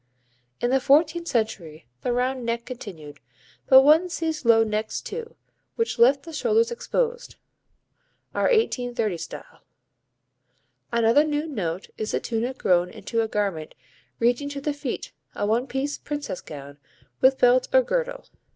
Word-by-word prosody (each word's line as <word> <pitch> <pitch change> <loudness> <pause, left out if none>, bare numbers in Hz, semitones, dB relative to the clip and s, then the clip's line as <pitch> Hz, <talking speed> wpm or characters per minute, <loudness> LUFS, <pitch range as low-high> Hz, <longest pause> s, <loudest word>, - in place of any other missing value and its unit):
In 240 - 0
the 270 - +4
fourteenth 315 +5 +3
century 195 - -2 0.2
the 250 - -1
round 250 +1 -1
neck 235 0 -2
continued, 180 - -9 0.5
but 265 0 +8
one 315 +5 +5
sees 320 -5 -3
low 225 -1 +6
necks 215 0 -2
too, 465 0 -7 0.4
which 460 - -1
left 270 +4 +5
the 330 - -10
shoulders 455 +7 +2
exposed 485 +1 -2 1.0
(our - - 0
1830 245 - +1
style). 165 +1 -9 1.3
Another 235 +4 +4
new 300 0 -1
note 190 - -4
is 215 - -3
the - - +1
tunic 240 +3 -3
grown 180 -1 +2
into 230 +4 -3
a 225 - -1
garment 200 -8 -2 0.4
reaching 245 +5 +1
to 285 -1 -5
the 290 +1 -2
feet, 285 -3 -5 0.2
a - - -1
one 230 +5 +1
piece 275 +2 -3
"princess" 290 -10 -5
gown, 145 -1 -10 0.4
with 265 +1 +5
belt 250 0 +4
or - - +5
girdle. - - -2
255 Hz, 145 wpm, -24 LUFS, 220-305 Hz, 1.3 s, but